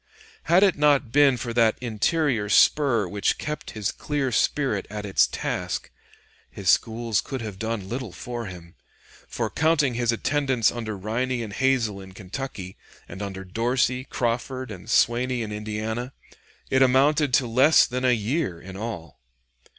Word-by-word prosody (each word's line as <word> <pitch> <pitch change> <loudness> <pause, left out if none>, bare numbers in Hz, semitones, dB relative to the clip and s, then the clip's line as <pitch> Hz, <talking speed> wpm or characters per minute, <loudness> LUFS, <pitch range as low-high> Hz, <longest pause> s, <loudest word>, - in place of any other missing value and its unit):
Had 180 +3 +5
it 195 -3 +4
not 145 -5 +3
been 140 -2 +5
for 120 0 -4
that 115 -2 +3
interior 120 0 0
spur 120 -2 +4
which 100 +2 0
kept 150 0 -5
his 105 -2 -1
clear 145 -3 -2
spirit 120 -3 0
at 105 0 -6
its 100 - +3
task, - - -4 0.6
his - - +1
schools 115 -1 +1
could 135 -3 -6
have 105 -3 -7
done 110 -3 -3
little 120 -1 -5
for 120 +3 -6
him; 85 -2 -11 0.5
for, - - -2
counting 155 -5 +2
his 120 0 +1
attendance 130 -1 +1
under 110 -3 -5
Riney 120 +5 -2
and 105 -3 -7
Hazel 120 -7 +1
in 95 -1 -12
Kentucky, 95 -1 -7 0.3
and 95 - -9
under 95 -1 -5
Dorsey, 125 +5 0
Crawford, 125 0 -3
and 95 -3 -10
Swaney 120 +1 +2
in 105 - -6
Indiana, 110 +4 -4 0.6
it 130 - +3
amounted 140 +3 +4
to 130 - +2
less 130 +7 +5
than 125 0 -4
a 130 - +4
year 115 - -2
in 95 +1 -10
all. 95 - -7
120 Hz, 155 wpm, -24 LUFS, 105-130 Hz, 0.6 s, Had